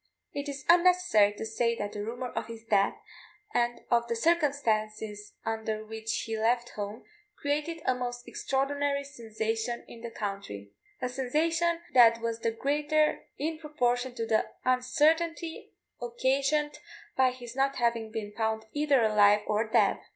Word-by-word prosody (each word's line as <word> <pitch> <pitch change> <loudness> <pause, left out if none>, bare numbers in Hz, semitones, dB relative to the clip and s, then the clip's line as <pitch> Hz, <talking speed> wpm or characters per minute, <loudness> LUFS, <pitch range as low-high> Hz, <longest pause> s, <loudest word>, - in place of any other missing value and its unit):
It 285 0 -4
is 275 -1 -6
unnecessary 345 - +5
to 215 - -6
say 230 +1 0
that 205 -2 -4
the 205 0 -5
rumour 245 +3 -4
of - - -4
his 230 -1 -9
death, 200 -3 +2 0.6
and 240 0 +1
of 235 0 +3
the 235 - -1
circumstances 220 -8 0
under 220 -1 -2
which 220 +1 -3
he 225 - -3
left 240 +2 +1
home, 205 +2 -6 0.4
created 300 +3 -2
a 255 - +3
most 245 -1 -5
extraordinary 280 +1 -1
sensation 225 -3 -3
in 230 - -12
the 235 - -5
country 195 - -6 0.3
a - - +2
sensation 325 +7 0
that 230 -2 +7
was 230 0 -2
the 230 0 0
greater 295 +6 +1
in 310 +2 -2
proportion 250 -5 -1
to 230 -2 -2
the 220 -1 +2 0.2
uncertainty 315 +6 +1 0.3
occasioned 275 +5 0 0.4
by 260 -1 +4
his 245 -1 -9
not 275 +1 +1
having 235 -2 0
been 215 -2 -4
found 220 0 -1
either 290 -4 +3
alive 210 -1 +5
or 215 +1 0
dead. 220 -3 +3
240 Hz, 150 wpm, -29 LUFS, 220-285 Hz, 0.6 s, that